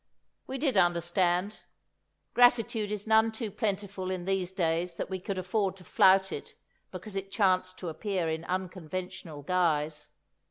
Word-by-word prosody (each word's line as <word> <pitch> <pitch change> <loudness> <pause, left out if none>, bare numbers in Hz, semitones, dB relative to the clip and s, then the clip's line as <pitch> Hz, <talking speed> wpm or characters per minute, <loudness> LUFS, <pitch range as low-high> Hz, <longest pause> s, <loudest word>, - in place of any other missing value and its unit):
We 265 - -4
did 265 -5 +1
understand. 175 +2 +2 0.8
Gratitude 230 -3 +4
is 210 -1 -3
none 220 0 +4
too 220 -1 -5
plentiful 200 -2 -2
in 185 -2 -3
these 190 -1 0
days 170 -1 0
that 185 - -5
we 190 - -2
could 190 +1 -4
afford 190 +1 0
to 190 - -15
flout 190 -1 +4
it - - -7 0.3
because 215 -2 -8
it 195 0 -3
chanced 185 -2 +1
to 180 - -6
appear 180 +1 -2
in 160 0 -2
unconventional 185 -3 -5
guise. 155 -3 0
185 Hz, 150 wpm, -29 LUFS, 175-205 Hz, 0.8 s, Gratitude